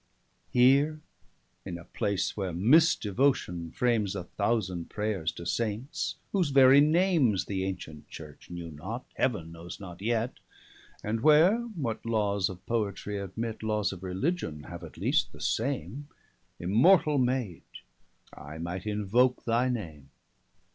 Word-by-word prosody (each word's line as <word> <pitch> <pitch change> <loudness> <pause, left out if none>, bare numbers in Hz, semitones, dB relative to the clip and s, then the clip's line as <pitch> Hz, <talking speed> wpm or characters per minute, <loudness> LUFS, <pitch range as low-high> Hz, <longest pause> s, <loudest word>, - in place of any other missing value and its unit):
_] - - -43 0.5
Here 140 +5 +4 0.6
in 90 -3 -5
a 85 - -12
place, 95 -3 -2
where 95 -3 -2
mis 130 - +5
devotion 100 -7 0
frames 110 -2 0
A 95 - -4
thousand 95 -3 -2
Prayers 105 -6 -2
to 85 - -9
Saints, 115 - -2 0.2
whose 180 -6 +1
very 135 0 +7
names 155 - +3
The 95 -2 -2
ancient 80 -6 -7
Church 75 -2 -11
knew 85 -1 -7
not, 95 - -6
Heaven 105 -11 -1
knows 85 +1 -9
not 90 -2 -10
yet: 115 +2 -1 0.6
And 110 +2 -2
where, 155 - +6 0.2
what 120 -8 -3
lawes 105 -4 0
of 95 -1 -10
Poetry 105 -2 -2
admit, 110 +4 -5
Lawes 105 -2 0
of 90 - -10
Religion 95 - -2
have 85 +1 -9
at 80 - -11
least - - +1
the - - -13
same, 130 - -2 0.5
515 - - -8
Immortall 145 - +5
Maide, 125 -8 -1 0.7
I 75 +2 -9
might 85 +4 -5
invoke 105 +5 +1
thy 120 +2 +2
name. 80 - -5
105 Hz, 140 wpm, -29 LUFS, 90-125 Hz, 0.7 s, very